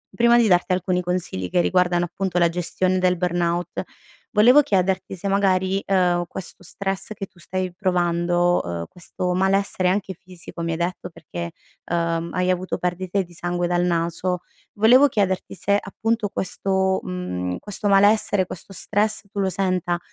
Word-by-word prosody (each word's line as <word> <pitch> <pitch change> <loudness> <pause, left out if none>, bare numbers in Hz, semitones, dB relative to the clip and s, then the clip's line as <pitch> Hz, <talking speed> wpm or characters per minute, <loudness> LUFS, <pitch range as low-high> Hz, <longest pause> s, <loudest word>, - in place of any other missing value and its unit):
prima 235 0 +5
di 235 -2 +4
darti 180 0 +3
alcuni 180 0 0
consigli, 175 - -3
che 175 - +3
riguardano 175 -1 +2
appunto 180 0 -2
la 170 -1 +4
gestione 180 +2 -1
del 180 0 +2
burnout, 175 -1 -1 0.5
volevo 245 +6 +7
chiederti 190 -6 0
se 190 +3 -5
magari, 195 -1 +2
ehm, 180 -2 +2
questo 185 +1 -8
stress 195 +3 -4
che 195 - -6
tu 180 - -24
stai 185 +1 -3
provando, 175 -1 +1
uhm, 85 -1 -4
questo 180 +1 -4
malessere 190 0 +1
anche 190 0 -1
fisico 180 -1 -11
mi 165 - -1
hai 160 - -2
detto, 175 +2 -3
perché 85 - -7 0.3
ehm, 170 0 -1
hai 180 0 0
avuto 185 +1 -2
perdite 185 +2 -1
di 175 - -16
sangue 175 +1 -2
dal 175 0 +1
naso, 170 +1 -1 0.3
volevo 245 +7 +6
chiederti 195 -6 -1
se 200 +1 +1
appunto 220 +1 -2
questo, 190 0 0
mhmm, 90 - -3
questo 205 0 -4
malessere 200 -1 +4
questo 185 +2 -10
stress 210 +4 -1
tu 200 - -4
lo 190 -1 +1
senta 180 -2 -1
185 Hz, 160 wpm, -23 LUFS, 175-195 Hz, 0.5 s, volevo